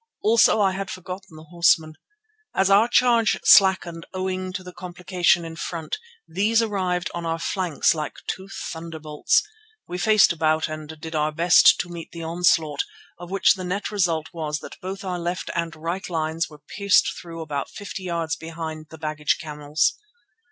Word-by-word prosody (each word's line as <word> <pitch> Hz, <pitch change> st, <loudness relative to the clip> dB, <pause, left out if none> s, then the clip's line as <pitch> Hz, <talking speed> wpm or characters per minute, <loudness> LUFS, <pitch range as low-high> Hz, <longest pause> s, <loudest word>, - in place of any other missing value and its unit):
Also 220 Hz, 0 st, +5 dB
I 195 Hz, -2 st, +3 dB
had 195 Hz, +1 st, -4 dB
forgotten 185 Hz, -1 st, -8 dB
the 155 Hz, -, -11 dB
horsemen. 165 Hz, -2 st, +3 dB, 0.6 s
As 195 Hz, 0 st, +3 dB
our 205 Hz, +4 st, +6 dB
charge 240 Hz, -2 st, +3 dB
slackened 185 Hz, -4 st, +5 dB
owing 185 Hz, 0 st, -2 dB
to 190 Hz, 0 st, -5 dB
the 180 Hz, 0 st, -10 dB
complication 180 Hz, -1 st, 0 dB
in 165 Hz, 0 st, -7 dB
front, 165 Hz, -, -4 dB, 0.3 s
these 220 Hz, +4 st, +2 dB
arrived 185 Hz, -5 st, -1 dB
on 170 Hz, -, -4 dB
our 165 Hz, 0 st, -1 dB
flanks 175 Hz, -2 st, +1 dB
like 155 Hz, -2 st, -4 dB
two 190 Hz, +1 st, -5 dB, 0.2 s
thunderbolts. 160 Hz, -2 st, 0 dB, 0.4 s
We 180 Hz, +1 st, -5 dB
faced 215 Hz, -1 st, +5 dB
about 155 Hz, -1 st, +1 dB
and 155 Hz, 0 st, -8 dB
did 160 Hz, +1 st, -7 dB
our 155 Hz, 0 st, +1 dB
best 170 Hz, +3 st, +6 dB
to -, -, -8 dB
meet 170 Hz, -1 st, -8 dB
the 170 Hz, -1 st, -7 dB
onslaught, 165 Hz, -3 st, +2 dB, 0.4 s
of 175 Hz, -1 st, -9 dB
which 195 Hz, +1 st, +4 dB
the 185 Hz, -, -7 dB
net 190 Hz, +4 st, -3 dB
result 170 Hz, -6 st, 0 dB
was 155 Hz, -2 st, -3 dB
that -, -, -11 dB
both 190 Hz, +2 st, -6 dB
our 180 Hz, -2 st, -3 dB
left 175 Hz, +2 st, -3 dB
and 170 Hz, -1 st, -2 dB
right 170 Hz, +5 st, -4 dB
lines 160 Hz, 0 st, -1 dB
were 150 Hz, -, -13 dB, 0.2 s
pierced 200 Hz, -1 st, +4 dB
through 165 Hz, -1 st, -8 dB
about 145 Hz, -3 st, -4 dB
fifty 205 Hz, -1 st, -7 dB
yards 170 Hz, -3 st, -2 dB
behind 160 Hz, -1 st, -7 dB
the 160 Hz, -, -11 dB
baggage 150 Hz, -1 st, -1 dB
camels. 150 Hz, 0 st, 0 dB
170 Hz, 170 wpm, -24 LUFS, 160-190 Hz, 0.6 s, our